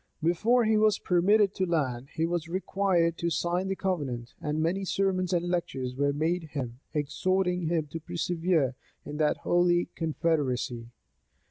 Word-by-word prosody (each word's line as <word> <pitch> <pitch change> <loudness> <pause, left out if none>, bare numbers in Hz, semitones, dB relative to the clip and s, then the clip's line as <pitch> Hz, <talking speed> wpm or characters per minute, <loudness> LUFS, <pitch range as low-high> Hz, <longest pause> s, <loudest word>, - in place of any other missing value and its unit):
Before 225 +9 +3
he 215 0 +3
was 215 -1 +4
permitted 195 +3 +3
to 190 - 0
land, 135 -7 -1
he 165 -1 +1
was 170 -1 -2
required 180 -2 +1
to 170 - 0
sign 175 +3 0
the 195 - -1
covenant; 140 -12 -3
and 150 0 -1
many 175 +5 0
sermons 190 -1 0
and 175 -1 +1
lectures 135 -8 -2
were 140 +1 +1
made 160 +4 -1
him, 125 -4 -4
exhorting 180 +4 0
him 160 -2 0
to 165 - -4
persevere 170 -3 0 0.3
in 150 - -6
that 150 -1 +2
holy 175 0 +2
confederacy. 145 -7 -1
170 Hz, 150 wpm, -28 LUFS, 150-185 Hz, 0.3 s, was